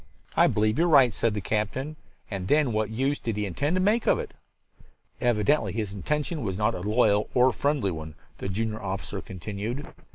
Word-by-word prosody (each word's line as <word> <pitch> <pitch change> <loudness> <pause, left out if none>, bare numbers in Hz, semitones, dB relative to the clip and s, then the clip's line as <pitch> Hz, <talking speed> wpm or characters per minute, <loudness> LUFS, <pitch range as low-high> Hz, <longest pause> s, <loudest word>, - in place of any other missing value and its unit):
"I - - +6
believe 110 +3 +1
you 170 - +4
are - - +2
right," 135 -8 +6
said 110 0 0
the 105 - -2
captain. 110 +9 -2 0.4
"And 95 -3 -3
then 145 0 +3
what 110 0 0
use 135 +6 0
did 115 -3 -3
he 105 - 0
intend 140 - -1
to - - +2
make 210 +5 +2
of - - +5
it?" - - -5 0.9
"Evidently 110 -2 +2
his 105 -3 -3
intention 150 - -2
was 95 -5 -2
not 105 +2 +1
a 90 - -5
loyal 105 0 +2
or 125 0 +5
friendly 140 -9 0
one," 80 -2 -7 0.2
the - - -4
junior 110 +2 -2
officer 95 0 -4
continued. 105 - -5
110 Hz, 195 wpm, -27 LUFS, 100-135 Hz, 0.9 s, I